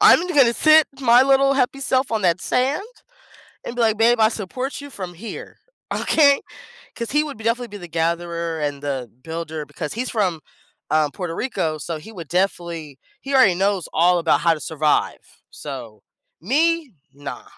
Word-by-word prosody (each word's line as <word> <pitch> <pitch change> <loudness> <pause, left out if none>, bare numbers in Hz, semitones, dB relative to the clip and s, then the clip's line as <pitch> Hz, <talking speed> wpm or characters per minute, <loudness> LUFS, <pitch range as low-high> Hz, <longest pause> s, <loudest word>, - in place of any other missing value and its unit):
I'm 385 -4 +6
gonna 275 -8 +4
sit 310 +2 +6
my 245 -1 +6
little 275 0 +4
happy 275 0 0
self 260 -2 0
on 220 - 0
that 175 -1 +2
sand 265 - 0 0.8
and 235 - -6
be - - -2
like, 220 -1 +3
"Babe, 235 +1 +4
I 220 - +6
support 250 +7 -5
you 285 0 -10
from 185 -7 -7
here, 215 +6 -9 0.4
okay?" 285 -3 +4 0.6
'Cause 235 -1 -5
he 295 +2 +3
would 285 -7 -7
b 220 - -11
definitely 235 +2 0
be 205 - -8
the 175 -3 -9
gatherer 170 0 -2
and 145 -1 -3
the 135 -5 -3
builder 160 -2 -5
because 150 -1 -6
he's 245 +3 -3
from, 185 -8 -1 0.5
um, 155 -2 +2
Puerto 175 -1 -5
Rico, 165 -11 -2
so 160 +2 -5
he 160 +9 -12
would 170 -7 -9
definitely 170 -5 -2 0.2
he 275 - -5
already 255 -9 +5
knows 195 -1 0
all 175 +2 +4
about 165 -1 +2
how 170 -1 +4
to 155 - -6
survive, 155 -1 -1
so, 120 -7 -9 0.4
me? 310 - +1 0.2
Nah. 145 +1 -8
195 Hz, 180 wpm, -21 LUFS, 165-255 Hz, 0.8 s, I'm